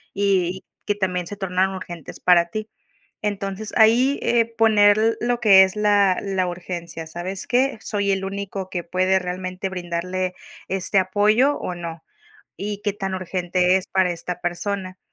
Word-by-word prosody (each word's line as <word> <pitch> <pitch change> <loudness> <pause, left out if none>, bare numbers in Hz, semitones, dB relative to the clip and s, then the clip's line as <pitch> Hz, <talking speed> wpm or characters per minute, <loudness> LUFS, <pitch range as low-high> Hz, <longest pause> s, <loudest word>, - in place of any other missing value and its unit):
y 190 -2 +1 0.3
y 205 - +4
que - - -16
también 180 -3 -2
se 205 - -6
tornaron 190 0 0
urgentes 175 -4 -8
para 175 -1 +5
ti. 215 +3 -5 0.5
Entonces, 205 0 -3
ahí, 245 +5 +5
eh, 235 -1 +2
poner 215 0 +4
lo 240 0 0
que 200 -5 +7
es 190 +2 +1
la 205 -3 +3
la 190 -2 -1
urgencia. 170 -2 -6
¿Sabes 180 +4 -5
qué? 255 -1 +1
¿Soy 200 -2 -1
el 195 0 0
único 195 -1 -5
que 180 -2 -4
puede 185 +2 +1
realmente 185 +1 -4
brindarle 180 0 -3 0.3
este 195 +1 0
apoyo, 210 +9 +3
o 180 - -5
no? 165 -2 -7 0.5
Y, 205 0 -5
¿qué 205 -1 0
tan 195 -2 -3
urgente 180 0 +1
es 190 0 -2
para 190 -1 +2
esta 175 +1 -5
persona? 185 +1 -3
190 Hz, 160 wpm, -22 LUFS, 180-205 Hz, 0.5 s, que